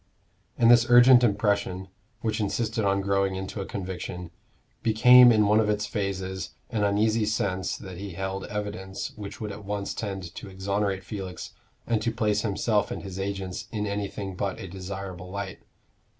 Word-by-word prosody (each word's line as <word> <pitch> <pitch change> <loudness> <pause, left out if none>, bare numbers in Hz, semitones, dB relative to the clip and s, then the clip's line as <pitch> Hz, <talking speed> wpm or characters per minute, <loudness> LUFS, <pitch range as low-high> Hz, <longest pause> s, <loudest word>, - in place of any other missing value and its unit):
And 115 0 +6
this 120 -1 +6
urgent 125 +1 +8
impression, 100 -4 +1 0.3
which 110 -1 -1
insisted 110 +2 -1
on 100 0 +2
growing 100 -1 +1
into 95 +2 -5
a 95 - -5
conviction, 90 -2 -5 0.5
became 125 +2 +8
in 105 -2 +4
one 105 +2 +4
of 110 -1 +2
its 105 0 0
phases 95 -3 -3 0.2
an 110 -3 0
uneasy 110 +2 +2
sense 100 -3 -1
that 95 -4 -9
he 100 -2 -6
held 95 +2 -4
evidence 100 -2 -5
which 105 -2 -8
would 105 -2 -4
at 105 +1 -9
once 100 0 -3
tend 95 -5 -5
to 100 - -8
exonerate 95 0 -1
Felix 95 -2 -6 0.3
and 115 -2 0
to 115 - 0
place 105 -3 +1
himself 105 0 +1
and - - -5
his 95 -1 -7
agents 95 -2 -4
in 105 -2 -2
anything 100 -1 -4
but 95 +1 -3
a - - -6
desirable 95 -1 -7
light. 100 0 -5
100 Hz, 165 wpm, -26 LUFS, 95-105 Hz, 0.5 s, urgent